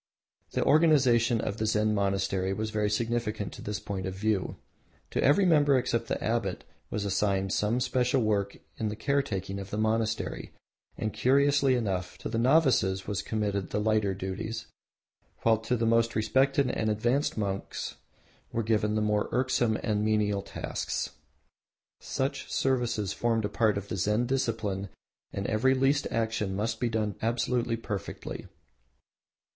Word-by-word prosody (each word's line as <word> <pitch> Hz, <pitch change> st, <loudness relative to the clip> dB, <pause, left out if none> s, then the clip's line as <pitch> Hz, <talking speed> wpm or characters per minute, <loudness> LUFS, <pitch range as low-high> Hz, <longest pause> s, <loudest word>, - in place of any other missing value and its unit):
The -, -, +1 dB
organisation 130 Hz, -7 st, +4 dB
of 100 Hz, -, -3 dB
the 110 Hz, 0 st, -1 dB
Zen 105 Hz, 0 st, +2 dB
monastery 95 Hz, -1 st, 0 dB
was 110 Hz, +2 st, -3 dB
very 105 Hz, -1 st, 0 dB
significant 110 Hz, -1 st, -2 dB
of -, -, -10 dB
this 105 Hz, -2 st, -3 dB
point 95 Hz, -2 st, -4 dB
of 95 Hz, -, -4 dB
view. 105 Hz, -1 st, -1 dB, 0.6 s
To -, -, 0 dB
every 150 Hz, +9 st, +5 dB
member, 145 Hz, -5 st, +5 dB
except 115 Hz, -2 st, -1 dB
the -, -, -2 dB
abbot, 110 Hz, -5 st, -1 dB, 0.3 s
was 105 Hz, -1 st, -2 dB
assigned 95 Hz, -1 st, 0 dB
some 110 Hz, +4 st, +1 dB
special 125 Hz, 0 st, +1 dB
work 100 Hz, -2 st, 0 dB, 0.2 s
in 110 Hz, -, -1 dB
the 105 Hz, -, -4 dB
caretaking 105 Hz, -7 st, -1 dB
of 100 Hz, 0 st, -7 dB
the 105 Hz, -, -4 dB
monastery, 110 Hz, 0 st, -1 dB, 0.4 s
and 110 Hz, -, -2 dB
curiously 140 Hz, 0 st, +3 dB
enough, 95 Hz, -6 st, -2 dB
to -, -, -5 dB
the 115 Hz, -, -1 dB
novices 120 Hz, -8 st, +3 dB
was 100 Hz, -2 st, -2 dB
committed 100 Hz, -4 st, -2 dB
the -, -, -1 dB
lighter 105 Hz, -2 st, +1 dB
duties, 105 Hz, +4 st, -4 dB, 0.8 s
while 110 Hz, -1 st, +4 dB
to 115 Hz, +3 st, -1 dB
the 115 Hz, -, 0 dB
most 115 Hz, +1 st, +2 dB
respected 130 Hz, +5 st, +2 dB
and 110 Hz, -, -1 dB
advanced 120 Hz, +8 st, 0 dB
monks 100 Hz, -2 st, -3 dB, 0.5 s
were 115 Hz, -, -1 dB
given 105 Hz, -1 st, +1 dB
the 110 Hz, -, +1 dB
more 105 Hz, 0 st, +1 dB
irksome 125 Hz, -3 st, +1 dB
and 105 Hz, -2 st, 0 dB
menial 105 Hz, -2 st, +1 dB
tasks. -, -, -4 dB, 0.9 s
Such 135 Hz, 0 st, -3 dB
services 120 Hz, -7 st, 0 dB
formed 115 Hz, -2 st, 0 dB
a -, -, -1 dB
part 110 Hz, -3 st, +2 dB
of 100 Hz, 0 st, -5 dB
the -, -, -4 dB
Zen 105 Hz, +6 st, +1 dB
discipline 110 Hz, -7 st, -1 dB, 0.4 s
and 100 Hz, -, -4 dB
every 125 Hz, +6 st, +2 dB
least 135 Hz, +2 st, +2 dB
action 110 Hz, -4 st, -1 dB
must 110 Hz, +3 st, -2 dB
be 120 Hz, -, 0 dB
done 110 Hz, -2 st, -1 dB
absolutely 120 Hz, 0 st, 0 dB
perfectly. 105 Hz, -4 st, -6 dB
110 Hz, 155 wpm, -29 LUFS, 105-120 Hz, 0.9 s, every